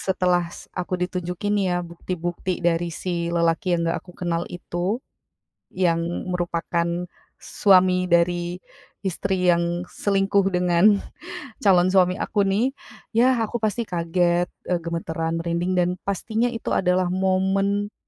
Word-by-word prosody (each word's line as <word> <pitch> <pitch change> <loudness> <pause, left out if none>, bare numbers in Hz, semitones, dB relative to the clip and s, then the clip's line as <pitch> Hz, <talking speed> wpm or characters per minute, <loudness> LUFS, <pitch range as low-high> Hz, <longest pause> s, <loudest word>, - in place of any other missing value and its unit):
setelah 180 -2 +1
s - - -11
aku 180 0 -5
ditunjukin 180 +2 -2 0.2
ya, 175 0 -1
bukti-bukti 175 +1 -4
dari, 170 0 +2
si 170 0 -3
lelaki 170 +3 +1
yang - - -2
gak - - -2
aku 180 - -15
kenal, 170 -1 -1
itu. 175 +4 -3 0.8
Yang 175 -3 +2 0.3
merupakan 175 -1 -1 0.5
suami 185 -2 +3
dari 175 0 +2 0.5
istri 190 +1 -1 0.2
yang 170 0 0
selingkuh, 195 -1 +1
dengan 180 -1 +2 0.8
calon 180 -3 +5
suami 185 0 +4
aku, 205 - 0
nih. 215 +8 +1 0.4
Ya, 250 +2 +4
aku 230 +1 -5
pasti 215 +2 0
kaget, 175 0 +1 0.2
eee, 180 - +1
gemetaran, 165 0 -2
merinding, 170 +2 -1
dan 175 0 +3
pastinya, 220 +5 -1
itu 230 -1 -3
adalah 180 0 +2
momen 195 +2 +1
180 Hz, 125 wpm, -23 LUFS, 170-195 Hz, 0.8 s, calon